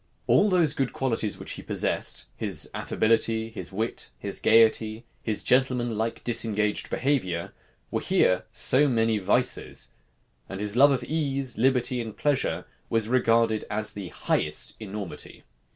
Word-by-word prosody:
All 210 - +4
those 170 -6 +3
good 135 -4 -1
qualities 115 -5 -1
which - - -7
he - - -6
possessed, 65 - -2
his - - -2
affability, 115 0 +1
his 110 - -5
wit, 110 +4 -3
his - - -2
gayety, 110 0 +3 0.2
his 110 -2 -3
gentleman 125 -3 +2
like, 115 +2 -3
disengaged 110 -3 +1
behavior, 105 -12 -1 0.4
were - - -1
here - - +2
so 145 +3 +4
many 115 -4 +1
vices; 105 +6 0 0.6
and 95 - -6
his 105 +1 -2
love 140 +3 +7
of 130 -3 0
ease, 140 -3 -2
liberty, 125 +1 +1
and 110 -2 -7
pleasure, 145 -3 0 0.2
was 115 -1 +1
regarded 115 -3 +2
as 105 0 -1
the 100 -3 -6
highest 75 -1 -1
enormity. 105 -4 -7
115 Hz, 140 wpm, -26 LUFS, 110-130 Hz, 0.6 s, love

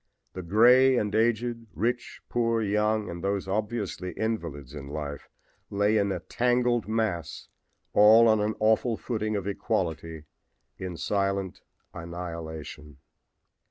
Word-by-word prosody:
The 90 - -5
gray 125 +8 +5
and 105 -3 -1
aged, 115 +1 0
rich, 120 +2 -2
poor, 115 -1 +1
young 105 0 +1
and 85 0 -7
those 100 -1 -1
obviously 100 -3 -3
invalids 85 - -4
in 70 -2 -8
life 70 0 -6 0.4
lay 100 +2 +2
in 100 -1 +1
a 90 -3 -3
tangled 120 +1 +1
mass 110 -6 -2 0.4
all 110 +3 +7
on 110 -1 +4
an 105 +1 -1
awful 110 +1 +2
footing 110 -3 -2
of 100 -2 -3
equality 80 -5 -2 0.6
in 90 -2 -5
silent 100 -1 -1 0.3
annihilation. 80 -3 -7
105 Hz, 125 wpm, -27 LUFS, 85-115 Hz, 0.6 s, all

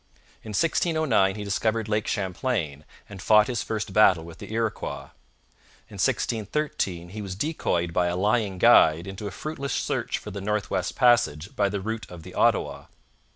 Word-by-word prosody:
In 110 - -10
1609 155 - +2
he 105 - -5
discovered 110 +2 -1
Lake 105 0 -1
Champlain 90 - -2 0.2
and 100 -2 -10
fought 105 +1 +5
his 120 -2 -2
first 105 -3 -4
battle 95 -6 +5
with 85 0 -12
the - - -9
Iroquois. 115 -1 -3 0.8
In - - -9
1613 105 - -1
he 105 +3 -7
was 95 -2 -5
decoyed 90 - -1
by 90 0 +2
a 85 +1 -1
lying 105 0 +1
guide 85 -6 +5
into 95 +2 -6
a - - -3
fruitless 140 +4 -5
search - - -1
for 105 - -8
the 100 0 -6
North 105 +1 -2
West 90 -1 -1
Passage 120 - +2
by 100 -1 +2
the 100 0 -3
route 110 +1 -4
of 85 -2 -10
the - - -11
Ottawa. - - +1
105 Hz, 170 wpm, -25 LUFS, 95-115 Hz, 0.8 s, fought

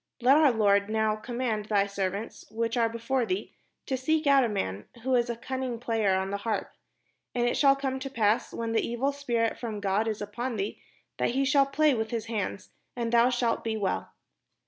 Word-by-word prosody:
Let 255 +3 +5
our 305 -3 +6
lord 205 -2 +3
now 220 0 +1
command 230 -1 -3
thy 205 -2 +2
servants, 200 +2 -4
which 230 +1 -2
are 230 -2 +2
be 230 - -6
fore 255 +2 0
thee, 370 +10 -3 0.3
to 265 - -1
seek 310 +5 0
out 280 -1 +6
a 235 - +1
man, 105 - -3 0.2
who 260 +1 0
is 240 -1 +2
a 235 - -1
cunning 260 +1 -4
player 225 -5 +1
on 190 +1 -1
an 200 - -2
harp: 215 -1 -3 0.6
and 240 0 +2
it 240 - +1
shall 275 -1 +5
come 265 -1 -2
to 270 +1 -5
pass, 220 -4 +1
when 230 -1 -3
the 225 - +2
evil 240 +4 -1
spirit 240 -5 -1
from 220 -4 -4
God 200 +2 0
is 215 -1 -2
upon 235 +4 -4
thee, 200 +1 -3 0.4
that - - +2
he 275 +1 +2
shall 280 -1 +4
play 300 +1 +3
with 220 -2 -2
his 225 -1 -3
hand, 210 -4 -3 0.3
and 235 -2 -2
thou 235 +1 +6
shalt 240 -2 0
be 225 -1 -1
well." 200 -3 -2
230 Hz, 215 wpm, -28 LUFS, 215-260 Hz, 0.6 s, our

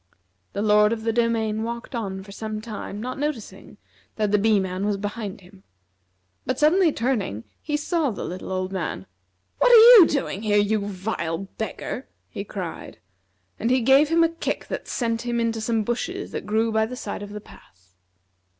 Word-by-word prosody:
The 200 - -2
Lord 210 0 +5
of 220 -1 -5
the 225 0 0
Domain 225 -2 0
walked 235 +2 -5
on 195 -5 -4
for 200 - -12
some 215 +1 -5
time, 215 -2 -7
not 255 +3 -5
noticing 290 -7 -5 0.4
that 210 -2 0
the 210 - +4
Bee 215 0 +3
man 190 0 -3
was 205 -1 0
behind 205 -1 -5
him. 185 +1 -18 0.8
But 255 - -2
suddenly 325 +4 +4
turning, 225 - -2 0.2
he 295 -1 -1
saw 310 -1 0
the 210 - -5
little 185 +1 -6
old 185 0 -2
man. 165 - -4 0.5
"What - - +5
are - - +9
you 455 -5 +10
doing 270 -8 -2
here, 210 -2 +2
you 205 +1 +2
vile 185 -4 -3 0.2
beggar?" 225 +3 -4 0.2
he - - -6
cried; - - -7 0.6
and 230 - 0
he 255 0 +3
gave 270 +5 +5
him 335 +1 +4
a 330 - +3
kick 330 0 -4
that - - -5
sent 230 -2 -1
him 240 -1 -2
into 230 -1 -1
some 225 0 0
bushes 330 - -3
that - - -5
grew 220 +2 +1
by 220 0 +2
the 250 - -7
side 205 -4 -5
of 205 - -7
the 210 +1 -7
path. 95 - -19
220 Hz, 185 wpm, -24 LUFS, 205-255 Hz, 0.8 s, you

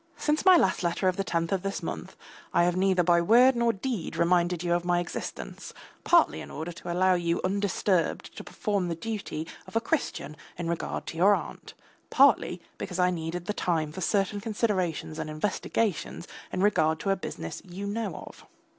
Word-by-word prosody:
Since 305 +4 0
my 370 -2 +8
last 190 - +2
letter 175 +2 0
of 185 - +2
the 195 - -1
tenth 165 -3 -1
of 195 -2 +1
this 195 +1 -3
month, - - -5 0.4
I - - +5
have 175 0 +2
neither 185 -1 +3
by 170 0 +4
word 245 +8 +6
nor 235 0 +3
deed 220 -3 -4
reminded 175 0 +2
you 175 -1 +1
of 175 0 +1
my 175 0 +2
existence, 175 - -6 0.3
partly 340 -2 +4
in - - -9
order 160 +3 -5
to 170 +1 -7
allow 185 +2 +3
you 170 -1 0
undisturbed 195 -2 0
to - - -7
perform 200 -5 -2
the 170 - -2
duty 195 -4 -4 0.2
of - - -13
a - - +5
Christian 235 - -2 0.2
in 170 -1 -3
regard 170 0 -3
to 165 - -7
your 200 +4 +6
aunt, - - -8 0.3
partly - - +4 0.2
because 180 - -4
I 180 0 +3
needed 170 0 -4
the 210 - -2
time 160 -6 -1
for 185 - -7
certain 200 +2 0
considerations 190 -8 -1
and - - -4
investigations 180 +2 -2 0.2
in 185 - -1
regard 160 -6 +3
to 195 - 0
a - - +3
business 80 - -6
you 190 +2 -7
know 205 -3 -3
of. - - -13
180 Hz, 190 wpm, -28 LUFS, 170-205 Hz, 0.4 s, my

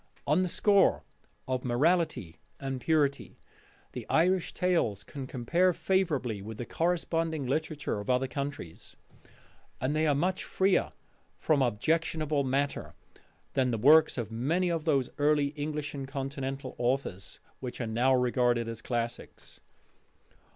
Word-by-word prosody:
On 150 +5 +3
the 185 - 0
score 200 +2 +3 0.4
of 130 -1 -1
morality 140 - +1 0.2
and 135 -2 -4
purity 150 -4 0 0.5
the - - -7
Irish 180 +2 +2
tales 165 - 0
can 135 +4 -7
compare 170 +10 +1
favourably 150 - 0
with 110 +2 -8
the 120 - -5
corresponding 165 -1 -1
literature 150 -3 -2
of 105 - -7
other 125 +1 +2
countries; 140 - -6 0.8
and 130 +4 -1
they 155 0 +2
are 145 - +3
much 180 +6 0
freer 190 0 +1 0.5
from 150 -3 +2
objectionable 155 +4 0
matter 140 +2 -2 0.6
than 130 -2 +2
the 115 - 0
works 150 +8 +6
of 115 -3 -3
many 165 +11 0
of 165 -2 -2
those 140 -6 +1
early 145 -1 +3
English 150 0 -4
and 135 -2 -5
Continental 135 -1 -4
authors 120 -7 -2 0.2
which 125 -2 -6
are 120 - -2
now 120 +4 +1
regarded 120 -2 +2
as 115 -1 -6
classics. 120 0 -5
140 Hz, 135 wpm, -29 LUFS, 125-160 Hz, 0.8 s, works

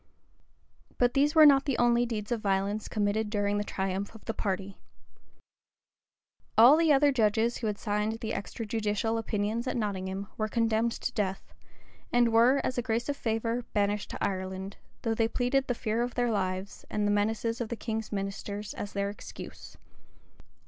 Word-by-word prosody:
But 245 0 +3
these 290 +3 +2
were 310 -1 +9
not 275 -2 +6
the 275 -4 0
only 240 0 +3
deeds 215 -2 -4
of 235 -2 0
violence 200 +1 0
committed 210 0 0
during 205 -1 0
the - - 0
triumph 195 +1 -3
of 220 - -14
the 225 - -2
party. 195 -2 -3 1.8
All 240 +6 +9
the 325 -1 +3
other 285 0 +5
judges 225 -1 +2
who 225 - -3
had 210 -1 -2
signed 210 0 -1
the 225 0 -5
extrajudicial 220 +1 -2
opinions 220 +2 -2
at 255 - -1
Nottingham, 195 -2 -3
were 215 - 0
condemned 230 0 +1
to 255 - -3
death, 195 -4 -3 0.6
and 240 -1 +3
were, 245 +5 +5
as 255 - -1
a - - +1
grace 235 +2 -1
or - - +2
favor, 230 -1 -1
banished 205 0 0
to - - -5
Ireland; 190 0 -3 0.3
though 225 - +1
they 225 0 +2
pleaded 260 +3 0
the 245 - 0
fear 225 0 -1
of 240 0 -2
their 245 -1 +1
lives, 185 -1 -2
and 210 -1 -1
the 205 - +2
menaces 225 +3 0
of 230 - -3
the 235 - -2
king's 220 -1 -4
ministers 200 +1 -4
as 205 - -6
their 200 0 -1
excuse. 205 - -10
220 Hz, 175 wpm, -29 LUFS, 205-240 Hz, 1.8 s, were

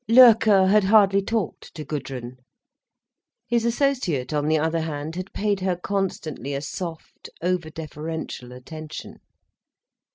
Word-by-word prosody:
Loerke 225 -5 +7
had 205 +1 +4
hardly 200 -1 +5
talked 210 -3 -3
to 155 -2 -6
Gudrun. 130 -4 -5 1.1
His 235 -1 +1
associate, 235 - 0
on 150 0 0
the 155 0 +3
other 160 +2 0
hand, 155 0 -4
had 185 +1 -5
paid 205 -1 0
her 185 -1 0
constantly 175 -7 -3
a 140 - -2
soft, 165 +1 -7
over 180 -2 0
deferential 155 -4 -6
attention. 155 +5 -9
170 Hz, 125 wpm, -24 LUFS, 150-200 Hz, 1.1 s, Loerke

